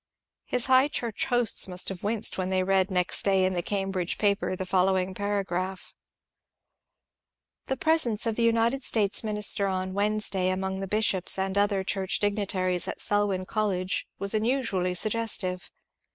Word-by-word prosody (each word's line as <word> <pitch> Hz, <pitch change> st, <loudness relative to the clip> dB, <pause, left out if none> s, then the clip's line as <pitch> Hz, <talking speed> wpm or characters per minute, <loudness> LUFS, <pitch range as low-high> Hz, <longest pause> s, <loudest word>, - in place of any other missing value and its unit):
His 250 Hz, -1 st, 0 dB
High 260 Hz, +1 st, +5 dB
Church 235 Hz, -6 st, -3 dB
hosts 245 Hz, -5 st, +2 dB
must 180 Hz, -1 st, -2 dB
have 190 Hz, -2 st, -7 dB
winced 215 Hz, +1 st, +1 dB
when 185 Hz, -1 st, -2 dB
they 185 Hz, 0 st, +1 dB
read 190 Hz, 0 st, +1 dB
next 180 Hz, -2 st, +1 dB
day 195 Hz, -1 st, +2 dB
in 185 Hz, -, 0 dB
the 175 Hz, -, -1 dB
Cambridge 195 Hz, -2 st, -3 dB
paper 200 Hz, -2 st, 0 dB
the 185 Hz, -, -5 dB
following 185 Hz, 0 st, +1 dB
paragraph: 190 Hz, -2 st, -3 dB, 0.8 s
— -, -, -62 dB
The 265 Hz, -, -2 dB
presence 260 Hz, -9 st, +2 dB
of 225 Hz, -1 st, -1 dB
the 235 Hz, -, -1 dB
United 230 Hz, +3 st, +2 dB
States 210 Hz, -4 st, +1 dB
Minister 210 Hz, -2 st, 0 dB
on 185 Hz, -1 st, -3 dB
Wednesday 200 Hz, -2 st, 0 dB
among 190 Hz, +1 st, -2 dB
the 195 Hz, -, -4 dB
bishops 195 Hz, -3 st, +1 dB
and 190 Hz, 0 st, -2 dB
other 200 Hz, -1 st, +1 dB
church 190 Hz, -1 st, -1 dB
dignitaries 190 Hz, -3 st, 0 dB
at -, -, -5 dB
Selwyn 205 Hz, -3 st, 0 dB
College 190 Hz, -3 st, -1 dB
was 200 Hz, +1 st, +2 dB
unusually 215 Hz, -6 st, 0 dB
suggestive. 205 Hz, -3 st, -1 dB
195 Hz, 155 wpm, -27 LUFS, 185-215 Hz, 0.8 s, High